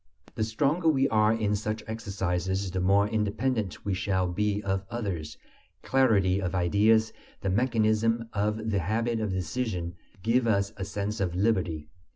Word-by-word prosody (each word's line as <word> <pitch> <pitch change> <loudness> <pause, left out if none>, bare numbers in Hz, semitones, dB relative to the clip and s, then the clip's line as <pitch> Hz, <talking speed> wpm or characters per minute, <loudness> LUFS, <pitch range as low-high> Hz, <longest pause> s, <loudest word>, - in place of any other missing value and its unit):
The 110 - -1
stronger 145 +10 +1
we 135 -3 +3
are 110 -1 +4
in 110 -2 +1
such 105 +1 -3
exercises, 95 -3 -2
the 95 - -2
more 100 +3 +3
independent 110 0 -1
we 100 - 0
shall 95 0 0
be 105 +3 -1
of 95 -1 -1
others. 95 -10 -4 0.5
Clarity 100 -8 +3
of 95 -1 -2
ideas, 105 +5 +3 0.3
the 95 - -1
mechanism 115 0 +1
of 105 +1 -1
the 100 - +1
habit 115 +6 0
of 110 -1 -1
decision, 90 -1 -2 0.3
give 115 +2 +2
us 100 -1 +1
a 95 - -4
sense 100 +2 -3
of 90 -3 -1
liberty. 90 -7 0
105 Hz, 155 wpm, -28 LUFS, 95-110 Hz, 0.5 s, are